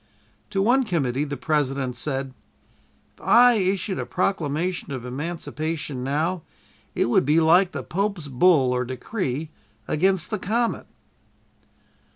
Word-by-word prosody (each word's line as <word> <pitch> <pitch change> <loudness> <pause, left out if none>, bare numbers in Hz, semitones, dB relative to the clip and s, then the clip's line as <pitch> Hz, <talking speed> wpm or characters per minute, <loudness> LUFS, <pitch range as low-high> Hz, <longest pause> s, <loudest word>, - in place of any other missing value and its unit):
To 195 -2 0
one 255 +5 +4
committee 145 - -1
the 140 -1 -5
President 135 -4 -1
said: 135 +1 -3 0.8
"If - - -23
I 245 +1 +6
issued 190 -2 0
a - - -3
proclamation 175 -2 -1
of 130 -3 -5
emancipation 150 0 -4
now 160 +6 -1 0.5
it - - +2
would 120 - +3
be 150 +4 +3
like 175 +3 +4
the - - -5
Pope's 195 -3 -2
bull 135 -1 +4
(or 125 0 0
decree) 140 - -4 0.4
against 190 +3 +1
the 215 - -1
comet!" 230 +5 -1
160 Hz, 130 wpm, -24 LUFS, 135-190 Hz, 0.8 s, I